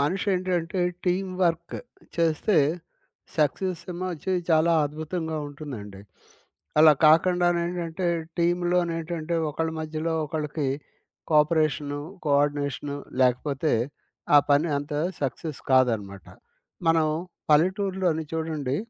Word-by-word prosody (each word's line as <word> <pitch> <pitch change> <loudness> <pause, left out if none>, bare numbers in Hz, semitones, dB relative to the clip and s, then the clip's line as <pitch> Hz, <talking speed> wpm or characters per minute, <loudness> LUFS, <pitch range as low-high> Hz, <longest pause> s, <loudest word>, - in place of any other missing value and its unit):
మనిషేంటంటే 185 +1 0 0.2
team 185 +1 0
work 170 -1 0 0.4
చేస్తే 165 +4 +2 0.8
success 170 +3 0
ఏమో 180 +2 -4
అచ్చి 170 +4 -3 0.2
చాలా 160 +1 +4
అద్భుతంగా 160 +2 -4
ఉంటుందండి. 125 -10 -8 0.8
అలా 155 0 +9
కాకుండానేంటంటే, 175 +1 +2 0.3
టీమ్‌లో 175 +1 +2
నేంటంటే, 165 0 -3 0.2
ఒకళ్ళ 160 +2 -2
మధ్యలో 155 +1 -3
ఒకళ్ళకి 150 -2 -2 0.6
కోపరేషను, 150 -2 +2 0.2
కోఆర్డినేషను 145 -1 0 0.2
లేకపోతే 135 +4 +1 0.6
ఆ - - +10
పని 145 +4 +4
అంత 145 +1 -6 0.3
సక్సెస్ 140 +2 -3
కాదనమాట. 110 -8 +2 0.6
మనం 165 -1 +4 0.4
పల్లెటూర్లోని 185 0 +2
చూడండి 155 -4 -2
160 Hz, 90 wpm, -26 LUFS, 145-175 Hz, 0.8 s, ఆ